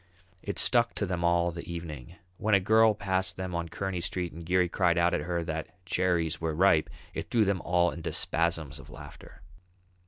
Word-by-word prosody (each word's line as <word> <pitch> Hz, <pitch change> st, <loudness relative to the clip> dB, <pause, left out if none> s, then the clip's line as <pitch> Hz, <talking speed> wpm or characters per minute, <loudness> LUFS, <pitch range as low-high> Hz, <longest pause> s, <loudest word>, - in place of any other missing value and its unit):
It 100 Hz, -, -5 dB
stuck 120 Hz, -2 st, +4 dB
to 100 Hz, -, -1 dB
them 90 Hz, -2 st, -3 dB
all 85 Hz, 0 st, +2 dB
the 85 Hz, 0 st, -8 dB
evening; 80 Hz, -3 st, -7 dB, 0.2 s
when 110 Hz, -2 st, +2 dB
a -, -, +5 dB
girl 110 Hz, +3 st, +4 dB
passed 95 Hz, -2 st, -1 dB
them 95 Hz, -1 st, -4 dB
on 85 Hz, -1 st, -3 dB
Kearney 95 Hz, 0 st, -3 dB
Street 90 Hz, 0 st, -3 dB
and 85 Hz, +2 st, -9 dB
Geary 90 Hz, +2 st, +2 dB
cried 85 Hz, 0 st, +1 dB
out 85 Hz, +1 st, +3 dB
at -, -, 0 dB
her 85 Hz, +2 st, -2 dB
that 80 Hz, +3 st, -6 dB
"Cherries 85 Hz, -4 st, 0 dB
were 80 Hz, -2 st, -2 dB
ripe!" 85 Hz, -2 st, +3 dB, 0.2 s
it -, -, -5 dB
threw 115 Hz, -3 st, +3 dB
them 95 Hz, -2 st, 0 dB
all 90 Hz, 0 st, +2 dB
into 85 Hz, -, -5 dB
spasms 80 Hz, -3 st, 0 dB
of -, -, -13 dB
laughter. -, -, -13 dB
85 Hz, 195 wpm, -28 LUFS, 85-95 Hz, 0.2 s, a